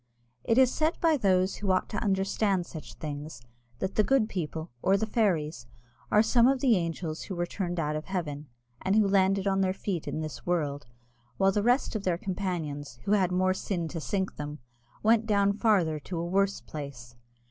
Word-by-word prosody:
It 230 Hz, -, +2 dB
is 260 Hz, -1 st, +6 dB
said 315 Hz, +2 st, 0 dB
by 325 Hz, -2 st, +4 dB
those 190 Hz, -6 st, +2 dB
who 205 Hz, -, -3 dB
ought 185 Hz, -, +1 dB
to 210 Hz, -, -3 dB
understand 195 Hz, -1 st, +1 dB
such 160 Hz, -2 st, -9 dB
things, 150 Hz, -3 st, -6 dB, 0.4 s
that 190 Hz, +9 st, -3 dB
the 215 Hz, -, +3 dB
good 245 Hz, -2 st, +2 dB
people, 160 Hz, -4 st, -4 dB
or 195 Hz, +1 st, +3 dB
the 220 Hz, -, 0 dB
fairies, 170 Hz, -, 0 dB, 0.4 s
are 210 Hz, -, +5 dB
some 235 Hz, +1 st, +4 dB
of 270 Hz, 0 st, +3 dB
the 250 Hz, -4 st, +4 dB
angels 165 Hz, -2 st, -3 dB
who 190 Hz, -, -5 dB
were 175 Hz, 0 st, 0 dB
turned 175 Hz, -1 st, -3 dB
out 150 Hz, -1 st, -1 dB
of 155 Hz, -, -4 dB
heaven, 150 Hz, -6 st, -4 dB, 0.3 s
and 190 Hz, +2 st, +1 dB
who 215 Hz, -2 st, +4 dB
landed 195 Hz, 0 st, +3 dB
on 195 Hz, -1 st, +2 dB
their 190 Hz, 0 st, +1 dB
feet 185 Hz, -5 st, -3 dB
in 155 Hz, -, -2 dB
this 155 Hz, -1 st, -6 dB
world, 145 Hz, -6 st, -1 dB, 0.5 s
while 195 Hz, 0 st, +4 dB
the 205 Hz, -, +1 dB
rest 245 Hz, +2 st, +2 dB
of 215 Hz, -, -1 dB
their 180 Hz, -3 st, +1 dB
companions, 170 Hz, -8 st, -4 dB
who -, -, -2 dB
had 190 Hz, -4 st, +3 dB
more 185 Hz, +1 st, +2 dB
sin 180 Hz, -3 st, -3 dB
to 165 Hz, -1 st, -5 dB
sink 190 Hz, +3 st, -2 dB
them, 150 Hz, 0 st, -5 dB, 0.5 s
went 225 Hz, 0 st, +4 dB
down 200 Hz, -2 st, +3 dB
farther 195 Hz, -8 st, +2 dB
to 170 Hz, +4 st, -6 dB
a 165 Hz, -, -2 dB
worse 195 Hz, +2 st, +1 dB
place. 130 Hz, -6 st, -8 dB
185 Hz, 200 wpm, -28 LUFS, 160-205 Hz, 0.5 s, is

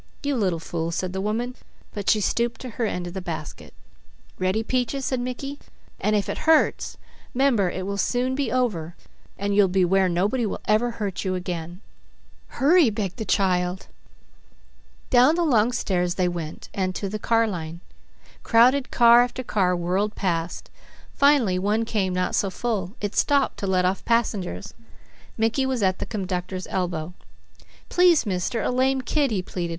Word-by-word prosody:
"You 285 Hz, -1 st, 0 dB
little 190 Hz, -8 st, 0 dB
fool," 165 Hz, 0 st, -4 dB
said 180 Hz, +2 st, -3 dB
the 190 Hz, -, -2 dB
woman, 235 Hz, +5 st, -2 dB, 0.4 s
but 205 Hz, -2 st, -2 dB
she 215 Hz, -, +3 dB
stooped 235 Hz, +3 st, 0 dB
to 255 Hz, -, -6 dB
her 225 Hz, +1 st, -1 dB
end 180 Hz, -3 st, -3 dB
of 175 Hz, -, -7 dB
the 190 Hz, -, -4 dB
basket. 165 Hz, -4 st, -7 dB, 0.7 s
"Ready, 185 Hz, +4 st, 0 dB
Peaches," 255 Hz, +3 st, -1 dB
said 260 Hz, -, -1 dB
Mickey, 255 Hz, +3 st, -5 dB, 0.4 s
"and 215 Hz, -, +1 dB
if 205 Hz, -, 0 dB
it -, -, -3 dB
hurts, 320 Hz, -, +3 dB, 0.4 s
'member 245 Hz, -8 st, +3 dB
it 185 Hz, +1 st, -5 dB
will 200 Hz, 0 st, -3 dB
soon 250 Hz, +4 st, 0 dB
be 275 Hz, +1 st, -1 dB
over, 195 Hz, -11 st, -1 dB, 0.4 s
and 200 Hz, 0 st, -1 dB
you'll 205 Hz, -1 st, +5 dB
be 185 Hz, 0 st, +2 dB
where 190 Hz, +1 st, +3 dB
nobody 200 Hz, +8 st, 0 dB
will 215 Hz, -, -2 dB
ever 215 Hz, +3 st, +2 dB
hurt 205 Hz, -5 st, -4 dB
you 185 Hz, -1 st, -1 dB
again." 175 Hz, 0 st, -5 dB, 0.7 s
"Hurry!" 310 Hz, 0 st, +4 dB
begged 205 Hz, -2 st, -4 dB
the 220 Hz, -, -4 dB
child. 185 Hz, -2 st, 0 dB, 1.3 s
Down 255 Hz, +5 st, +6 dB
the 345 Hz, -, +1 dB
long 240 Hz, -7 st, +3 dB
stairs 180 Hz, -7 st, -1 dB
they 180 Hz, -1 st, +1 dB
went 170 Hz, -3 st, -5 dB
and 185 Hz, -1 st, -2 dB
to 200 Hz, -, -3 dB
the 210 Hz, +2 st, -4 dB
car 230 Hz, +1 st, +2 dB
line. 170 Hz, -5 st, -5 dB, 0.6 s
Crowded 255 Hz, +4 st, +4 dB
car 235 Hz, 0 st, +6 dB
after 245 Hz, +1 st, -2 dB
car 185 Hz, -6 st, +1 dB
whirled 185 Hz, +5 st, -1 dB
past; 170 Hz, -3 st, -3 dB, 0.4 s
finally 275 Hz, -10 st, +3 dB
one 210 Hz, +4 st, +1 dB
came 200 Hz, -4 st, -1 dB
not 180 Hz, 0 st, -1 dB
so 195 Hz, -, +1 dB
full, 200 Hz, -1 st, -3 dB
it 205 Hz, -1 st, -3 dB
stopped 280 Hz, -2 st, +2 dB
to 200 Hz, -, -3 dB
let 185 Hz, -1 st, +2 dB
off 185 Hz, +2 st, 0 dB
passengers. 230 Hz, -6 st, -1 dB, 0.6 s
Mickey 225 Hz, +4 st, +1 dB
was 255 Hz, -5 st, -1 dB
at 185 Hz, -1 st, +1 dB
the -, -, -4 dB
conductor's 185 Hz, -2 st, -4 dB
elbow. 175 Hz, -2 st, -2 dB, 0.8 s
"Please 355 Hz, -5 st, +4 dB
mister, 200 Hz, +4 st, -1 dB
a -, -, 0 dB
lame 260 Hz, +1 st, +1 dB
kid," 285 Hz, +2 st, +1 dB
he 200 Hz, -5 st, -1 dB
pleaded. 175 Hz, -1 st, -4 dB
205 Hz, 170 wpm, -24 LUFS, 180-245 Hz, 1.3 s, Down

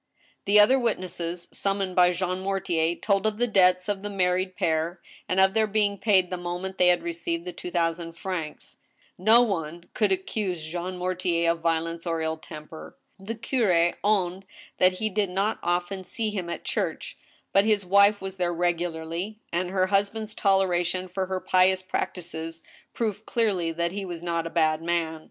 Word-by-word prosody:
The 205 Hz, +1 st, +5 dB
other 255 Hz, +6 st, +6 dB
witnesses, 180 Hz, -6 st, -3 dB
summoned 195 Hz, -2 st, -1 dB
by 180 Hz, -1 st, +6 dB
Jean 180 Hz, +1 st, -2 dB
Mortier, 175 Hz, -4 st, 0 dB
told 200 Hz, +2 st, +1 dB
of 215 Hz, -1 st, -2 dB
the 245 Hz, -, +2 dB
debts 185 Hz, -4 st, +3 dB
of 205 Hz, -2 st, -2 dB
the 205 Hz, -, -5 dB
married 185 Hz, -1 st, 0 dB
pair, 165 Hz, +2 st, 0 dB, 0.3 s
and 185 Hz, -, +1 dB
of 190 Hz, 0 st, +5 dB
their 220 Hz, -1 st, +2 dB
being 205 Hz, -1 st, 0 dB
paid 190 Hz, -4 st, +3 dB
the 180 Hz, -, -2 dB
moment 175 Hz, +2 st, -5 dB
they 180 Hz, -, +5 dB
had 175 Hz, -1 st, +3 dB
received 170 Hz, 0 st, -3 dB
the 180 Hz, -, -5 dB
two -, -, -7 dB
thousand 165 Hz, -1 st, -1 dB
francs. 170 Hz, -4 st, -6 dB, 0.4 s
No 220 Hz, +6 st, +6 dB
one 170 Hz, -5 st, -3 dB
could 210 Hz, -4 st, +1 dB
accuse 190 Hz, -2 st, -2 dB
Jean 175 Hz, +3 st, -4 dB
Mortier 180 Hz, -2 st, 0 dB
of 170 Hz, -, -3 dB
violertce 165 Hz, +1 st, -1 dB
or 165 Hz, -1 st, 0 dB
ill 160 Hz, 0 st, -2 dB
temper. 155 Hz, 0 st, -10 dB, 0.2 s
The 210 Hz, +4 st, -5 dB
curi 210 Hz, -8 st, +2 dB
owned 195 Hz, -2 st, +1 dB, 0.3 s
that 185 Hz, 0 st, +5 dB
he 215 Hz, +4 st, -2 dB
did 205 Hz, -1 st, 0 dB
not 195 Hz, +4 st, -1 dB
often 175 Hz, +2 st, -1 dB
see 220 Hz, +3 st, -3 dB
him 185 Hz, -4 st, -4 dB
at -, -, -5 dB
church, -, -, -3 dB, 0.4 s
but 195 Hz, -, +5 dB
his 210 Hz, -3 st, +2 dB
wife 200 Hz, +2 st, +5 dB
was 190 Hz, 0 st, -6 dB
there 175 Hz, -1 st, 0 dB
regularly, 175 Hz, +3 st, -2 dB, 0.2 s
and 175 Hz, +1 st, 0 dB
her 185 Hz, 0 st, +2 dB
husband's 205 Hz, +3 st, 0 dB
toleration 185 Hz, -2 st, +1 dB
for 185 Hz, +1 st, -2 dB
her 190 Hz, 0 st, -2 dB
pious 185 Hz, 0 st, +3 dB
prac 185 Hz, -, -2 dB
tices 165 Hz, -2 st, -7 dB, 0.3 s
proved 215 Hz, -2 st, -2 dB
cleariy 190 Hz, -8 st, 0 dB
that 170 Hz, +1 st, 0 dB
he 200 Hz, +1 st, -4 dB
was 175 Hz, -3 st, -6 dB
not 170 Hz, -1 st, -1 dB
a -, -, -5 dB
bad 155 Hz, -2 st, +2 dB
man. 165 Hz, -1 st, -1 dB
185 Hz, 180 wpm, -26 LUFS, 170-195 Hz, 0.4 s, other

